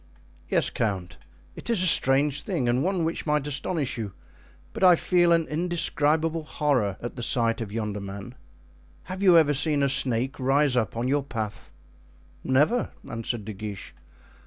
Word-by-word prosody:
"Yes, - - +1
count, 95 -6 -3 0.4
it - - -9
is 220 -6 +2
a - - +3
strange 145 -3 +3
thing 125 - -2
and 125 +3 +1
one 185 -1 0
which 165 0 -3
might 150 -1 +1
astonish 145 -2 -2
you, 105 -4 -5 0.6
but - - -4
I 180 -2 +8
feel 175 0 +2
an 165 -1 +3
indescribable 160 -1 0
horror 140 -10 -1
at 120 +2 -6
the - - -4
sight 115 -1 0
of 105 -3 -5
yonder 105 -2 -3
man. 100 +4 -8 0.7
Have 185 +1 -7
you 185 -4 +6
ever 150 -3 +4
seen 145 0 +2
a 140 - +2
snake 130 -1 0
rise 135 +1 +2
up 115 -2 -1
on 120 +2 -1
your 145 +2 +1
path?" 110 -4 -6 0.7
"Never," 150 - +2 0.2
answered 115 -1 -4
De 110 - -6
Guiche. 100 -1 -8
135 Hz, 165 wpm, -25 LUFS, 115-160 Hz, 0.7 s, I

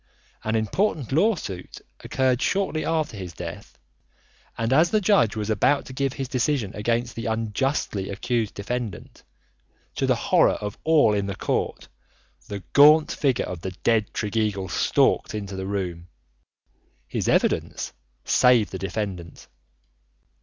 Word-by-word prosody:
An 110 +1 -1
important 135 - 0
lawsuit 150 - -1 0.2
occurred 130 -1 +1
shortly 190 -5 0
after 155 -7 -1
his 90 -4 -7
death, - - -8 0.8
and 115 +2 0
as 160 +5 +5
the 215 - +2
judge 190 - +3
was 110 0 -2
about 140 +6 +2
to 130 - -9
give 135 0 -1
his 135 -1 -4
decision 125 -4 -1
against 115 +3 -1
the 115 +1 -5
unjustly 110 -2 -1
accused 110 +2 -2
defendant, 115 +1 -5 0.7
to - - -1
the - - +3
horror - - +3
of 105 0 -5
all 155 -9 +4
in 100 -1 -1
court, - - -2 0.6
the 100 -2 -6
gaunt 150 +2 +7
figure 135 -4 0
of 90 -2 -6
the 95 -1 -5
dead 110 -3 +2
Tregeagle 105 -3 -1
stalked - - +2
into 100 -2 -5
the 95 0 -4
room. 90 -4 -4 1.0
His - - -3
evidence - - 0 0.3
saved 125 -5 +4
the 95 - -5
defendant. 95 -3 -5
115 Hz, 135 wpm, -24 LUFS, 100-135 Hz, 1.0 s, gaunt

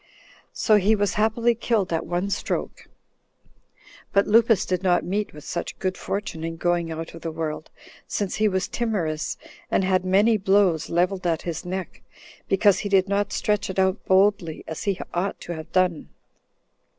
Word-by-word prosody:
15 - - -29 0.4
So 215 - +3
he 210 +2 +3
was 205 -1 0
happily 225 +2 +2
killed 220 -5 0
at 165 - -2
one 180 +3 -1
stroke. - - -3 1.2
But 200 0 +3
Lupus 225 0 +4
did 185 -1 -1
not 180 -3 +2
meet 200 +4 -2
with 150 -1 -12
such 170 +1 -5
good 185 -1 -2
fortune 200 -5 -4
in 165 0 -4
going 175 -1 0
out 160 0 -6
of 165 - -10
the 165 - -3
world, 155 -1 -4 0.4
since 200 -3 -2
he 215 - +3
was 190 -2 0
timorous, 175 -10 -2 0.3
and - - +2
had 185 -1 +2
many 205 +4 +4
blows 190 -4 +2
leveled 180 +2 0
at 165 -2 0
his 170 +1 -4
neck, 185 +1 -5 0.5
because 200 0 +4
he 205 - -3
did 195 -1 +3
not 200 0 0
stretch 210 -2 0
it 190 - -5
out 190 +2 +1
boldly 190 -3 +2
[as 160 - -6
he 200 -3 0
ought 185 +3 -2
to 175 - -5
have 160 0 -8
done]. 180 -4 +1
190 Hz, 175 wpm, -24 LUFS, 170-205 Hz, 1.2 s, Lupus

